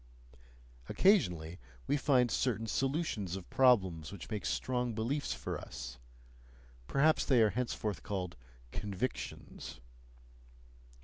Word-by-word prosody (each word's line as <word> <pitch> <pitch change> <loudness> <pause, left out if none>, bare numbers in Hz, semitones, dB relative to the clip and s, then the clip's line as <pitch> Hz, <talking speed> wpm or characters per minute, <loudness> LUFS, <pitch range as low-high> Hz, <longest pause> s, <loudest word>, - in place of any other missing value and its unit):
Occasionally 90 - +3 0.3
we - - +2
find 130 -4 +3
certain 115 -3 0
solutions 130 - -1
of 95 -2 -7
problems 95 -11 +4
which 100 +2 -9
make 105 -2 -2
strong 125 -2 -1
beliefs 130 +7 -1
for - - -3
us; 65 0 -8 0.9
perhaps 150 - +4
they 130 -3 +4
are 105 - +3
henceforth 110 -7 -2
called 90 -5 -3 0.4
"convictions." 100 - -4
110 Hz, 105 wpm, -33 LUFS, 95-130 Hz, 0.9 s, problems